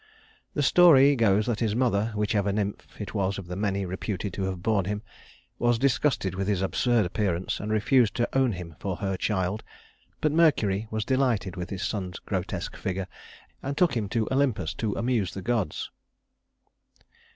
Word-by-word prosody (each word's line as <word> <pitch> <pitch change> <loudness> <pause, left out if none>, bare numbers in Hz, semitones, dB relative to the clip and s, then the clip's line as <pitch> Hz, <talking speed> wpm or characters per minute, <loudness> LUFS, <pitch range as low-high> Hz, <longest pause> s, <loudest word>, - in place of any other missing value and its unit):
The 145 - +1
story 145 -3 +7
goes 105 -3 +3
that 120 -3 -1
his 110 -3 0
mother 115 -3 +1
whichever 105 -1 +1
nymph 100 0 -4
it 105 - -6
was 100 -2 0
of 95 - -6
the 90 +1 -6
many 100 -1 -1
reputed 95 +1 -4
to 95 - -2
have 95 -2 -4
borne 105 -4 +2
him 105 +2 -3 0.6
was 120 0 +3
disgusted 130 -6 +1
with 95 +1 -2
his 100 -2 +1
absurd 115 +3 +2
appearance, 90 -1 -1
and 105 +1 -4
refused 110 +1 +3
to 120 - +1
own 130 -4 +3
him 85 -3 -8
for 95 -2 -3
her 95 -2 -2
child; 95 +1 -1 0.6
but 155 - +1
Mercury 115 -11 +2
was 110 -1 -2
delighted 125 -8 +1
with 90 -1 -5
his 95 -1 -4
son's 95 -4 -3
grotesque 95 -3 -4
figure, 95 0 -3 0.6
and 140 +2 -4
took 175 -5 +3
him 105 -4 -1
to 110 0 0
Olympus 125 - +1
to 110 -3 -2
amuse 115 -5 0
the 95 - -5
gods. 115 -9 -1
105 Hz, 175 wpm, -27 LUFS, 95-120 Hz, 0.6 s, story